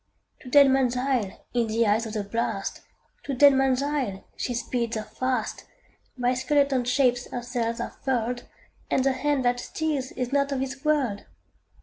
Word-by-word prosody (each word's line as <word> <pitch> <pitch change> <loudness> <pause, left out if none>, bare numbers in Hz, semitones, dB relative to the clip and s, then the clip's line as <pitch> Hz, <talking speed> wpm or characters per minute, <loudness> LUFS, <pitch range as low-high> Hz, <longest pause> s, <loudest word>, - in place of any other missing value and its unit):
To 255 - -11
Deadman's 265 -2 +5
Isle, 250 -6 -1
in 240 -2 +1
the 225 +1 +1
eye 210 0 +4
of 225 -1 -5
the 210 -2 -2
blast, 200 -1 -3 0.4
To 275 - -4
Deadman's 270 -1 +5
Isle, 265 -10 -2
she 245 - -3
speeds 235 -1 -2
her 215 - -3
fast; 255 +3 -3 0.5
By 245 0 +2
skeleton 265 0 +1
shapes 250 -1 +2
her 245 - -4
sails 235 -1 -2
are - - -3
furled, 245 -2 -1 0.4
And 260 - +2
the 270 - +3
hand 270 0 0
that 245 0 +2
steers 290 -1 -2
is 250 +1 -3
not 280 0 +2
of 275 - -1
this 265 +1 -4
world! 275 -10 0
255 Hz, 165 wpm, -26 LUFS, 235-270 Hz, 0.5 s, Deadman's